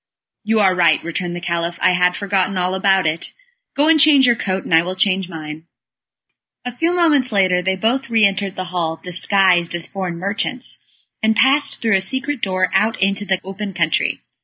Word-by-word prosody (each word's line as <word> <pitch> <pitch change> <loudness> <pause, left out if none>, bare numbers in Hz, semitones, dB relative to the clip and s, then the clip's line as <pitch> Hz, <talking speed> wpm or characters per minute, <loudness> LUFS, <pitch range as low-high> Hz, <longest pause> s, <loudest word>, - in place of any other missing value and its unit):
"You 220 +1 +1
are 190 -2 +4
right," 170 -3 +3
returned 175 +1 -4
the - - -5
Caliph, 170 0 -3
"I 185 - +3
had 180 0 +2
forgotten 195 -1 -1
all 180 0 -1
about 190 -1 +2
it. 160 +2 -3 0.4
Go 290 +2 +3
and 325 -1 +4
change 285 -3 +6
your 240 -1 +4
coat, 190 -3 -3
and - - -4
I 165 - +6
will 180 +2 -5
change 190 -1 0
mine." 155 -1 -8 1.0
A 245 -1 -5
few 330 +6 0
moments 295 -8 +2
later 185 -3 +2
they 190 +1 -1
both 240 +7 -1
re 225 -2 +4
entered 195 -1 -1
the 185 - -4
hall, 165 -2 -1
disguised 180 -1 +1
as 170 -1 -5
foreign 185 -3 -5
merchants, 210 +7 -4 0.4
and 220 0 +2
passed 275 +3 +1
through 225 -4 +3
a - - -3
secret 265 +6 -3
door, 185 -1 0
out 220 +1 +1
into 195 +1 0
the 190 -2 0
open 195 0 -7
country. 170 -3 0
190 Hz, 195 wpm, -18 LUFS, 180-225 Hz, 1.0 s, change